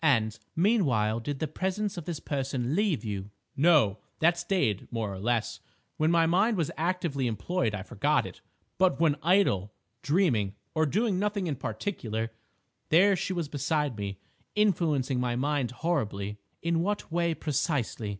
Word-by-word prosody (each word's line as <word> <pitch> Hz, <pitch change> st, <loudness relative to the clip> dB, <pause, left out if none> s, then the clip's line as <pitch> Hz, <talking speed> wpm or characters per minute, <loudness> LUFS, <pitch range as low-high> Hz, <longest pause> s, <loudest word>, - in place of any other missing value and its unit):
"And, 115 Hz, -7 st, +2 dB, 0.2 s
meanwhile, 140 Hz, -, +2 dB
did 140 Hz, +5 st, -4 dB
the 155 Hz, -, -2 dB
presence 190 Hz, +6 st, -2 dB
of 175 Hz, -4 st, -6 dB
this 170 Hz, -4 st, -4 dB
person 135 Hz, -1 st, -2 dB
leave 195 Hz, -, +1 dB
you?" 100 Hz, -2 st, -4 dB, 0.3 s
"No; 140 Hz, -, +4 dB, 0.2 s
that 170 Hz, +2 st, +4 dB
stayed 175 Hz, -, -1 dB
more 110 Hz, -4 st, -2 dB
or 95 Hz, -, -7 dB
less. 115 Hz, +2 st, -1 dB, 0.4 s
When 155 Hz, +1 st, +2 dB
my 165 Hz, -1 st, +4 dB
mind 195 Hz, +7 st, +3 dB
was 165 Hz, -4 st, 0 dB
actively 165 Hz, -6 st, -1 dB
employed 115 Hz, -, -1 dB
I 95 Hz, -, -5 dB
forgot 125 Hz, +5 st, +1 dB
it, -, -, -10 dB, 0.4 s
but 185 Hz, -7 st, +3 dB
when 160 Hz, -3 st, +4 dB
idle, 160 Hz, -, +3 dB, 0.3 s
dreaming, 130 Hz, -, +1 dB, 0.2 s
or 160 Hz, -1 st, +2 dB
doing 205 Hz, -, +1 dB
nothing 205 Hz, -1 st, 0 dB
in 155 Hz, -4 st, -1 dB
particular, 115 Hz, -, -3 dB, 0.6 s
there 195 Hz, +5 st, +6 dB
she 185 Hz, -, -2 dB
was 170 Hz, -4 st, -2 dB
beside 150 Hz, -2 st, -1 dB
me, 100 Hz, -2 st, -4 dB, 0.4 s
influencing 160 Hz, -11 st, +2 dB
my 125 Hz, -1 st, 0 dB
mind 140 Hz, -1 st, 0 dB
horribly—" 105 Hz, -, -2 dB, 0.2 s
"In 170 Hz, 0 st, +1 dB
what 205 Hz, 0 st, -2 dB
way, 170 Hz, -1 st, +1 dB
precisely?" 140 Hz, -, -1 dB
150 Hz, 155 wpm, -28 LUFS, 115-175 Hz, 0.6 s, there